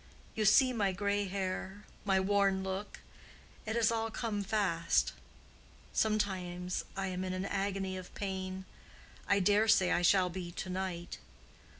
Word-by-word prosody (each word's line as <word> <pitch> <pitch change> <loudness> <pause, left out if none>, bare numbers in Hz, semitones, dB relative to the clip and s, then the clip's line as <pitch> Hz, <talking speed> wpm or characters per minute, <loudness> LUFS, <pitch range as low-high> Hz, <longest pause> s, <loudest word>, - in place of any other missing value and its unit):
You 215 - 0
see 255 +5 +6
my 200 -5 +1
gray 200 +1 0
hair, 190 +1 -4 0.2
my 195 -2 +3
worn 195 0 +2
look: 190 +1 -5 0.7
it 220 - -1
has 230 -1 +3
all 225 0 -1
come 215 -2 -2
fast. 195 -5 +1 0.8
Sometimes 185 -4 -1
I 195 - -1
am 185 0 -3
in 185 0 -3
an 185 +1 -2
agony 195 -1 -2
of 185 -1 -9
pain—I 190 +1 -4
dare 205 +3 +3
say 190 -5 +4
I - - +2
shall 180 0 +4
be 175 -1 -5
to 185 - -5
night. 180 -2 -4
195 Hz, 140 wpm, -33 LUFS, 185-205 Hz, 0.8 s, see